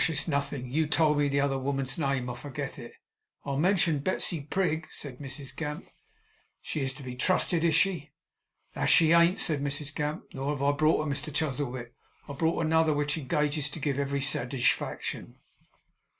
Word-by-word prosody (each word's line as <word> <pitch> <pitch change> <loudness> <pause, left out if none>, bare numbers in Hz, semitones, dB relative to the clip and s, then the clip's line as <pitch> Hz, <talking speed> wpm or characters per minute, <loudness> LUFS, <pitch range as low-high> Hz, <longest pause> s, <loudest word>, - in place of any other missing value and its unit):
It's 145 -1 0
nothing. 140 -3 -1
You 155 +2 +1
told 150 -1 +3
me 145 - +3
the 140 0 +1
other 135 -1 +1
woman's 135 +1 -1
name. 135 -4 0
I 120 - -3
forget 130 +2 -6
it.' - - -9 0.5
'I 140 -1 -2
mentioned 165 -3 +2
Betsey 175 -2 0
Prig,' 160 +1 -1
said 135 -4 -7
Mrs 135 -1 -7
Gamp. 150 +2 -5 0.7
'She 155 - -4
is 135 -1 -1
to 140 - -11
be 125 -1 -6
trusted, 170 +3 +2
is 165 -2 +3
she?' 165 -6 +1 0.6
'That - - -1
she 160 -1 +6
ain't!' 170 +4 +5
said 150 -4 0
Mrs 145 +1 -3
Gamp; 150 0 -2
'nor 135 +1 -3
have 140 -1 -3
I 140 - +4
brought 155 +1 +2
her, 145 - -1
Mr 140 +2 -3
Chuzzlewit. 130 -5 -2 0.3
I've 140 -1 -8
brought 165 0 +1
another, 160 -1 +3
which 145 0 0
engages 150 0 0
to 155 - -7
give 140 -1 -1
every 140 0 -1
satigefaction. 130 -2 -1
145 Hz, 180 wpm, -29 LUFS, 140-160 Hz, 0.7 s, she